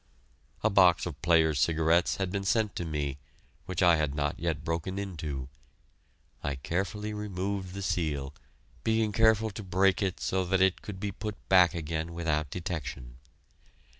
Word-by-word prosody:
A 110 - +3
box 90 -3 +5
of 75 -7 -6
Players' 80 -3 +3
Cigarettes 80 +4 +3
had 95 -2 -2
been 100 0 -2
sent 105 +1 +1
to 85 - -3
me, 70 -3 -3 0.5
which 95 0 -1
I 85 -2 +6
had 75 -2 -1
not 75 0 -1
yet 80 -3 -2
broken 85 +4 -2
into. 80 -9 -4 1.0
I 70 -1 -1
carefully 100 +9 -3
removed 100 -2 -3
the 100 - -4
seal, 75 -6 -1 0.5
being 110 -1 +1
careful 110 0 +3
to 105 - -7
break 95 +1 +2
it 95 -3 -1
so 95 0 0
that 95 +1 +1
it 95 -1 +3
could 100 -3 -7
be 100 0 -2
put 105 +2 -5
back 90 -2 +6
again 80 +1 -3
without 75 -3 -1
detection. 75 -8 -5
90 Hz, 160 wpm, -29 LUFS, 80-100 Hz, 1.0 s, I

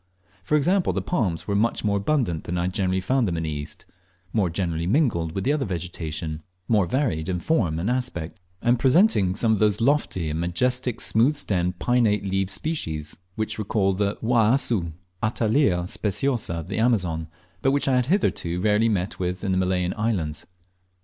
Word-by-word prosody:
For 125 - +1
example, 180 +5 +2
the - - -1
palms 100 - -1
were 100 - 0
much 115 +3 +1
more 100 -1 +1
abundant 100 - 0
than 90 - -3
I 85 - 0
had 90 +1 -2
generally 95 -1 0
found 125 +5 +1
them 85 -2 -2
in 80 - -2
the 80 - -2
East, 75 0 -6 0.5
more 100 -5 +2
generally 85 -1 -2
mingled 95 - +1
with 95 - -2
the 140 - +2
other 150 -2 0
vegetation, 80 - -4 0.3
more 105 -5 +3
varied 95 - -1
in 90 -1 -1
form 85 - +1
and 85 +5 -2
aspect, 115 -8 -3 0.2
and 120 0 +3
presenting 130 - +4
some 110 +1 +2
of 105 - 0
those 105 -1 +2
lofty 115 - +1
and 80 - -2
majestic 125 +8 -1
smooth 120 +7 +3
stemmed, 90 -9 0
pinnate 110 -1 +2
leaved 95 0 0
species 95 - -3 0.2
which 110 0 -3
recall 100 -2 +1
the 100 +1 0
Uauassu 115 - +2 0.3
(Attalea 110 -4 +1
speciosa) 105 +1 -1
of 85 0 -5
the - - -3
Amazon, 90 -9 +1 0.3
but 135 - +3
which 140 +1 +1
I 135 - +3
had 125 -1 +1
hitherto 115 - 0
rarely 105 +3 +3
met 95 -3 -2
with 90 +1 -2
in 100 - 0
the 95 - +1
Malayan 90 -1 0
islands. 95 -9 -2
100 Hz, 185 wpm, -24 LUFS, 90-120 Hz, 0.5 s, presenting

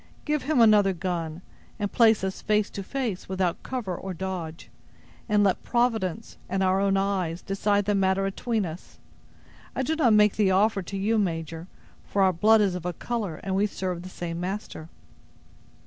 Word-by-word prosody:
Give 300 -1 0
him 285 -1 +1
another 210 -4 +6
gun, 170 -2 -4 0.3
and 205 -2 -2
place 225 -4 +4
us 190 0 -3
face 210 -1 +1
to 200 - -5
face, 225 -4 -4
without 185 -2 -1
cover 235 -9 -4
or 190 +1 -6
dodge, 175 -3 -5 0.6
and 210 -1 +4
let 195 -2 +2
Providence, 225 -5 -1
and 195 +1 0
our 190 0 +2
own 195 -1 +2
eyes, 190 -4 -1
decide 200 +1 0
the 205 - +1
matter 195 0 +2
atween 215 +2 -1
us! 165 +1 -9 0.8
I 265 - 0
do 315 +4 0
not 260 -8 +4
make 210 -1 +4
the 205 -3 +3
offer, 195 +2 +3
to 195 +2 -6
you, 215 +3 +1
major; 165 -3 -3 0.4
for 200 - +1
our 190 -1 +4
blood 215 +6 +5
is 200 -3 +2
of 180 -2 -5
a 180 0 -2
color, 215 -5 -3
and 190 -1 -2
we 200 +2 +2
serve 185 -3 -4
the 185 - -9
same 170 -2 -5
master." 180 -3 -5
195 Hz, 180 wpm, -26 LUFS, 180-215 Hz, 0.8 s, another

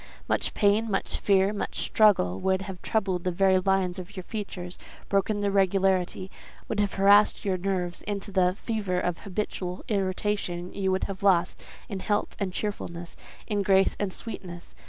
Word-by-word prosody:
Much - - -1
pain, 210 +2 +3
much 195 - -1
fear, 195 0 +3
much 205 - -4
struggle, 175 - +3
would 190 0 +1
have 190 -2 -8
troubled 190 -5 0
the 185 - +1
very 190 +1 +3
lines 190 -1 +1
of 185 +3 -9
your 185 - -4
features, 185 -4 -6 0.3
broken 205 +1 +1
their 200 -1 +1
regularity, 190 -1 +1 0.4
would 215 - -2
have 205 -1 +1
harassed 200 +2 +5
your 190 -2 +1
nerves 180 -1 -2
into 200 0 -5
the 185 -1 +2
fever 205 -5 -2
of 180 -1 -2
habitual 185 -2 -4
irritation; 190 -3 -1
you 190 -1 0
would 185 - 0
have 195 -1 -5
lost 185 -3 +2 0.3
in 195 -3 -5
health 205 +2 -1
and 195 -3 -1
cheerfulness, 175 -4 -5 0.3
in 205 -2 -1
grace 195 0 +3
and 205 -2 -1
sweetness. 180 -5 -7
195 Hz, 165 wpm, -27 LUFS, 180-205 Hz, 0.4 s, harassed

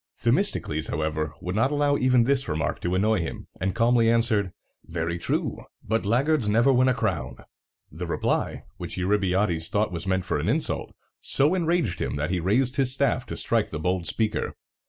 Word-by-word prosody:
Themistocles, 80 +1 +1
however, 75 -1 -2
would 90 - -3
not 115 +6 +2
allow 145 -1 +2
even 130 -3 +3
this 135 -3 +1
remark 75 0 -2
to 90 +1 -1
annoy 105 +2 +2
him, 85 - -5
and 95 0 -1
calmly 115 0 +3
answered, 115 -5 +2 0.3
"Very 85 +1 -3
true, - - -1 0.2
but 110 -1 -1
laggards 130 +1 +2
never 120 +6 +4
win 130 +1 +4
a 130 - +3
crown!" 75 - -2 0.6
The - - -6
reply, - - -1
which - - -5
Eurybiades 95 -3 +1
thought 105 -1 0
was 85 +1 -5
meant 95 -1 0
for - - -1
an - - -1
insult, - - -1 0.2
so 145 +5 +2
enraged 170 - 0
him - - -2
that 75 +4 -2
he 90 - 0
raised 120 +9 +1
his 135 -2 +2
staff 130 -2 0
to - - -5
strike 115 -2 +1
the 80 - -4
bold 90 +2 -1
speaker. 110 -1 -1
105 Hz, 180 wpm, -25 LUFS, 85-125 Hz, 0.6 s, never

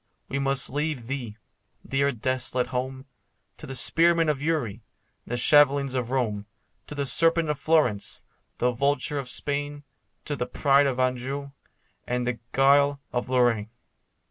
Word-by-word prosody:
we 135 - -2
must 135 -2 +1
leave 145 -3 -2
thee, 120 -4 -5 0.5
dear 140 +1 +1
desolate 125 0 -1
home, 130 +1 -3 0.5
To 150 - -9
the 135 - -6
spearmen 165 +4 +3
of 145 -2 -1
Uri, 140 -9 -1 0.5
the 120 - -2
shavelings 140 +1 +4
of 125 -3 -2
Rome, 110 -6 -1 0.4
To 150 - -7
the 140 -1 -1
serpent 165 +3 +2
of 145 - -4
Florence, 140 -11 +1 0.3
the 125 - +2
vulture 140 +3 0
of 130 -2 -6
Spain, 145 +1 -3 0.4
To 145 - -2
the 125 - -3
pride 140 -1 +3
of 130 -2 -2
Anjou, 130 +2 -1 0.6
and 125 0 -1
the 120 -1 -2
guile 140 +1 +4
of 125 0 -2
Lorraine. 120 -4 +2
135 Hz, 145 wpm, -26 LUFS, 125-145 Hz, 0.6 s, shavelings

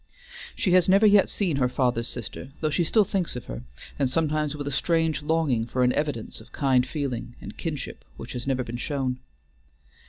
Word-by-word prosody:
She 190 - 0
has 180 0 +5
never 195 +3 +6
yet 205 -1 +6
seen 175 -8 0
her 125 -2 +2
father's 125 -2 0
sister, 120 +2 -7
though 155 -1 0
she 170 - +2
still 210 +6 +4
thinks 190 -6 -1
of 125 - -6
her, - - -6 0.4
and 135 -2 +2
sometimes 155 0 0
with 145 -1 -5
a - - -1
strange 160 +1 +1
longing 150 -7 +1
for 125 +1 +1
an 125 - +4
evidence 145 -8 -2
of 110 - -17
kind 130 -3 +2
feeling 130 -5 -3
and - - -9
kinship 155 -6 -5
which - - -7
has 125 +1 -5
never 130 -2 +1
been 120 0 -5
shown. 130 -2 -2
140 Hz, 195 wpm, -26 LUFS, 125-165 Hz, 0.4 s, never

